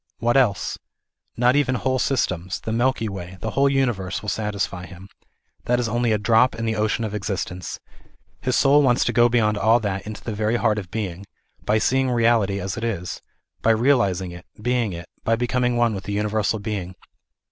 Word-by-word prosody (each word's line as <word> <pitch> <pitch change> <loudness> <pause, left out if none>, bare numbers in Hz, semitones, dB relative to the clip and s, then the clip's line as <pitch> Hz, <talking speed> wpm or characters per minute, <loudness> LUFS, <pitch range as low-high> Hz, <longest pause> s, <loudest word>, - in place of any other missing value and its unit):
What 120 +1 +1
else? 120 -8 +1 0.6
Not 125 +2 +4
even 140 -3 +2
whole 130 +1 0
systems, 95 -10 -1
the 110 - -5
Milky 120 0 +1
Way, 95 -2 -7
the - - -4
whole 140 0 +3
universe 120 -10 -1
will 105 - -2
satisfy 100 -3 -3
him; 95 +1 -12 0.6
that 120 0 +2
is 120 - 0
only 120 0 0
a 105 - +3
drop 110 +4 +3
in 115 - -3
the 110 0 0
ocean 110 +1 0
of 105 -2 -3
existence. 95 -3 -4 0.6
His 130 - 0
soul 145 +1 +5
wants 125 -3 +3
to - - 0
go 120 0 +5
beyond 110 -3 +2
all 115 +3 +4
that 100 -2 -3
into 110 -1 -7
the 115 - -4
very 110 +2 0
heart 110 -3 +1
of 95 -4 -8
being, 100 -3 -5 0.4
by 105 - +3
seeing 130 +4 +2
reality 115 -5 +2
as 95 +2 -4
it 115 - -4
is; 95 -7 -3 0.4
by - - +2
realizing 110 -7 +2
it, 85 0 -11
being 120 -1 0
it, 85 0 -7 0.2
by 115 - +2
becoming 125 +1 0
one 120 -2 +2
with 95 -1 -6
the 100 - -3
Universal 105 +1 0
Being. 100 -4 -4
110 Hz, 195 wpm, -23 LUFS, 100-120 Hz, 0.6 s, soul